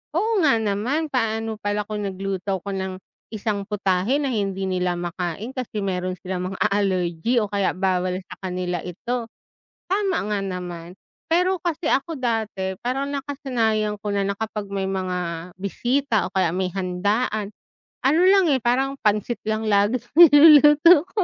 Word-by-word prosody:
Oo 430 +4 +1
nga 280 -6 +5
naman, 225 +10 -1
paano 225 -3 -1
pala 205 0 -1
kung 210 -1 -4
nagluto 195 0 -3
ako 200 - -5
ng 190 0 -3 0.4
isang 205 -1 -2
putahe 195 +2 0
na 275 -2 -1
hindi 195 -3 -2
nila 180 -1 0
makain 175 +5 -4
kasi 230 -5 -4
meron 185 -1 -2
silang 185 0 -4
mga - - -9
allergy 190 +1 0
o 210 -1 -3
kaya 200 -2 +1
bawal 185 -1 0
sa - - -9
kanila 180 -1 -2
ito. 230 +7 -4 0.6
Tama 390 -2 +1 0.2
nga 205 - 0
naman. 180 -2 -6 0.4
Pero 365 +2 +3
kasi 335 -1 -2
ako 290 +3 0
dati, 220 -6 -2
parang 270 +3 -2
nakasanayan 235 -7 -1
ko 205 0 -4
na, 200 -1 0
na 200 - -1
kapag 215 -1 -4
may 195 -1 -2
mga 180 -3 -3
bisita 240 +4 0
o - - -40
kaya 185 -4 +2
may 185 -1 -1
handaan, 200 +3 -1 0.5
ano 305 +5 +4
lang, 385 0 +5
eh, 260 - 0
parang 265 +3 +1
pancit 210 +2 +1
laging 215 +1 +1 0.2
niluluto 300 0 +8
ko. 425 - 0
210 Hz, 155 wpm, -23 LUFS, 190-255 Hz, 0.6 s, niluluto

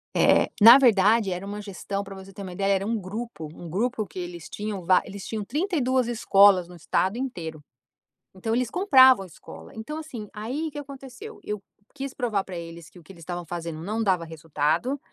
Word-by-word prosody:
É, - - +4
na 230 +4 +11
verdade 220 -4 +4
era 180 +2 -4
uma 205 +1 -6
gestão 200 0 -5
para 195 0 -10
você 190 0 -11
ter 200 - -9
uma 185 -2 -7
ideia 195 +2 +1
era 195 0 0
um 230 +1 0
grupo, 200 -4 -6
um 170 0 -10
grupo 220 +5 -1
que 185 - -14
eles 175 -2 -7
tinham 205 -3 -5
va 185 +1 +5
eles 200 -1 -8
tinham 220 -2 -3
32 260 - 0
escolas 200 -5 +5
no 180 - -13
estado 185 +6 -1
inteiro. 165 - -5 0.7
Então 225 +4 -2
eles 245 -1 0
compravam 260 - +6
escola, 165 - -13
então 225 +8 -6
assim, 250 -10 -8
aí 250 +10 -4
o - - -8
que 290 - -8
aconteceu? 280 - -10
Eu 210 -2 -4 0.3
quis 275 -1 -6
provar 225 -6 -1
para 185 - -8
eles, 165 -2 -9
que - - -17
o - - -15
que 195 - -14
eles 170 - -16
estavam 175 +1 -5
fazendo 165 -1 -6
não 215 +5 -2
dava 185 -5 +1
resultado, 160 - -1
200 Hz, 200 wpm, -25 LUFS, 180-245 Hz, 0.7 s, na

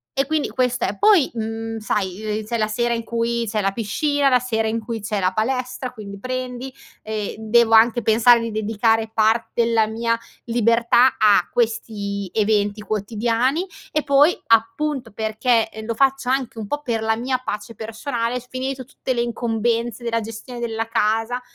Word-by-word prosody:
e 275 0 +1
quindi 310 -1 0
questo 250 -1 0
è. 200 - -2
Poi, 405 -10 +5
mhmm, 225 0 -4
sai, 200 -2 -2 0.2
ehm, 215 - -7
c'è 235 +2 -2
la 215 - +1
sera 235 +2 0
in 230 0 -2
cui 235 0 -1
c'è 210 0 -1
la 195 0 +1
piscina, 275 +7 0
la 250 - +5
sera 225 -3 -1
in 225 +1 -1
cui 225 0 -5
c'è 210 0 -2
la 185 0 +1
palestra, 250 +3 -2
quindi 200 -4 -9
prendi 255 +1 -4 0.3
e 215 -1 -4
devo 225 +1 +3
anche 230 +2 +5
pensare 235 +2 +5
di 230 - -3
dedicare 220 +1 +1
part 220 +1 +2
della 230 -2 +2
mia 230 +1 0 0.3
libertà 235 +2 +3
a 205 -5 +4
questi 205 -4 -2
eventi 210 -1 +1
quotidiani 230 - 0 0.3
e 305 - 0
poi, 285 +4 +4
appunto, 230 +2 +1
perché 220 +2 +1
e 220 0 -8
lo 230 0 -3
faccio 270 0 +2
anche 260 -4 -1
un 210 - -5
pò 290 +5 -3
per 230 -3 -1
la 220 0 +2
mia 255 +2 -1
pace 210 +1 -5
personale, 230 +2 -3
sc 250 +1 -18
finito 260 0 -4
tutte 260 -1 -4
le 235 - +1
incombenze 235 0 -1
della 230 -1 0
gestione 225 +3 -8
della 225 -1 -3
casa, 225 +2 0
230 Hz, 175 wpm, -21 LUFS, 220-250 Hz, 0.3 s, Poi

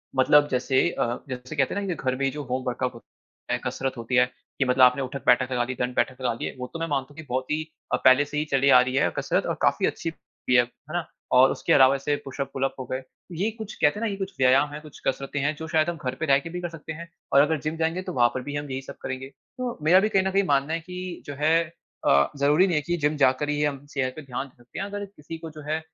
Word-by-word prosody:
मतलब 145 +3 +5
जैसे 130 +5 +2
अ, 120 -6 -1
जैसे 130 +3 -6
कहते 135 -3 +1
हैं 205 - -1
ना 180 - -1
घर 130 -3 -1
में 135 0 +1
जो 150 0 -5
होम 130 0 -3
वर्कआउट 125 0 -1
हो, 115 - -12 0.6
कसरत 130 +1 -2
होती 115 +2 -2
है, 125 - +6 0.3
कि 135 - +3
मतलब 125 0 +4
आपने 125 +2 +5
उठक-बैठक 130 -1 +1
लगा 125 -1 +1
ली 125 +1 -4
दंड-बैठक 125 +1 -1
लगा 120 -2 +1
दिए - - -5
वो 125 - -4
तो 165 - -5
मैं 165 - -2
मानता 135 -3 -1
हूँ - - -17
कि 160 - -8
बहुत 130 +1 -2
ही 155 +1 0 0.3
अ, - - +6
पहले 130 +3 +7
से 150 +1 -5
ही 150 - 0
चली 135 0 +3
आ 125 -2 +8
रही 130 +1 -1
है 140 - +3
कसरत - - 0
और - - -1
काफ़ी - - +3
अच्छी 165 - -3
भी 125 -5 -4
है। 120 - +7
है 135 +6 -14
ना? 175 -2 -2 0.2
और 130 +1 +6
उसके - - 0
अलावा 135 0 +6
ऐसे 145 +2 0
पुश-अप, 135 0 -4
पुल-अप 135 0 -1
हो 130 - -4
गए, 130 - -2 0.3
ये 190 +7 -1
कुछ 215 -2 -7
कहते 150 +8 +3
है 230 - -1
ना - - +1
ये - - -3
कुछ 195 0 -4
व्यायाम 130 +3 +4
हैं 150 - -6
कुछ 150 -3 -13
कसरतें 135 +2 -1
हैं 145 +3 +1
जो 160 +2 -7
शायद 160 0 +2
हम 170 - -3
घर 125 +1 -1
पे - - 0
रह 140 -2 +5
के 165 - -8
भी 180 +1 -5
कर 175 - -3
सकते 160 -1 -8
हैं 170 +2 -8 0.3
और 140 - +8
अगर 150 +1 +2
जिम 155 +1 -2
जाएँगें 165 +3 -1
तो - - -5
वहाँ 120 -2 +4
पर 130 - -3
भी 145 +1 -5
हम 145 0 -4
यही 130 +1 -3
सब - - -10
करेंगे। 130 0 -5
तो 240 - -7
मेरा 180 +4 +7
भी - - +1
कहीं 195 -2 +3
न 190 - 0
कहीं 200 +1 +3
मानना 140 +1 +2
है 165 - 0
कि 180 +1 -7
जो 145 - -6
है 155 +2 +3 0.5
अ, 70 0 +4
ज़रूरी 150 +6 +4
नहीं 175 - 0
है 150 - +2
कि 175 +4 -1
जिम 150 -1 +1
जाकर 135 +1 +3
ही 150 0 0
हम 145 -1 -2
सेहत 130 -2 -1
पे 155 - -7
ध्यान 135 0 -5
दे 130 - -24
सकते 120 0 -10
हैं, 195 - -2
अगर 205 0 -5
किसी 165 -4 -10
को 160 0 -8
जो 155 0 -10
है 155 +1 +1
140 Hz, 285 wpm, -25 LUFS, 130-160 Hz, 0.6 s, आ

